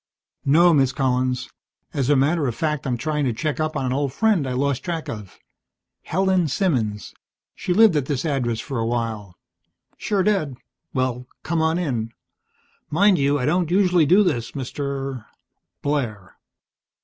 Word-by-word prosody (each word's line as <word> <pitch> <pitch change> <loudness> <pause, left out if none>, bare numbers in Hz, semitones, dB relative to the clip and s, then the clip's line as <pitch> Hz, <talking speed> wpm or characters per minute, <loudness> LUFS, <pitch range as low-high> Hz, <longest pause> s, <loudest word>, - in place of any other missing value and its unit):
"No, 170 +5 +5
Miss 135 -4 +3
Collins. 130 -1 0 0.5
As 135 -2 0
a 145 - +5
matter 145 +2 +2
of 120 - -2
fact, 150 -3 -2
I'm 125 -2 0
trying 150 +4 -1
to 125 - 0
check 150 +6 -2
up 155 0 -1
on 135 - -1
an 125 - 0
old 140 0 -1
friend 200 -4 +1
I 130 - -2
lost 140 0 0
track 170 -3 -3
of. 105 -4 -8 0.6
Helen 185 -1 +1
Simmons. 125 - -1 0.4
She - - -4
lived 210 -1 +6
at 140 -3 0
this 140 -1 -2
address 125 -7 -1
for 135 0 -4
a 115 - 0
while." 110 -5 -3 0.6
"Sure 200 -3 0
did. 170 -11 0 0.3
Well, 125 -1 -2 0.2
come 165 0 0
on 160 +1 +2
in. 120 -10 -2 0.8
Mind 190 +3 +4
you, 140 +1 +2
I 125 - -1
don't 170 +2 +1
usually 180 -4 +3
do 190 +7 +6
this, 120 - -1
Mr. 135 -2 -4 0.3
" - - -57
"Blair." 115 -10 -2
140 Hz, 165 wpm, -22 LUFS, 125-165 Hz, 0.8 s, lived